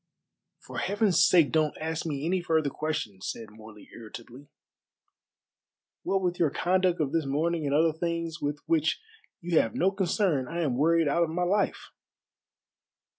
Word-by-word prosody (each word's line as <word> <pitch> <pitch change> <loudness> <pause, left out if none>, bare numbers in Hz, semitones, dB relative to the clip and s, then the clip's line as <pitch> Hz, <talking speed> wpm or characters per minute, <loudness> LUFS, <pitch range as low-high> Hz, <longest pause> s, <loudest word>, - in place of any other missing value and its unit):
"For - - -8
Heaven's 200 -3 +2
sake 165 -5 +5
don't 155 -2 +1
ask 160 +1 -3
me 145 -1 -3
any 180 +2 0
further 160 -4 +1
questions," 115 -11 -4
said 110 -2 -7
Morley 110 -1 -14
irritably. 120 +4 -11 1.5
"What 195 -1 -1
with 180 -1 -1
your 165 - +3
conduct 180 +3 +1
of 145 -3 0
this 165 -4 0
morning 155 +2 0
and 140 - +1
other 160 +1 +3
things 170 0 -3
with 145 0 -3
which 160 -1 +1 0.4
you 170 -2 +2
have 115 - -1
no 190 +2 +2
concern 185 - 0
I 170 +4 -3
am 140 -7 0
worried 165 +3 +3
out 155 +4 +1
of 170 - +2
my 175 +3 -1
life." 200 +3 -1
160 Hz, 160 wpm, -28 LUFS, 145-175 Hz, 1.5 s, sake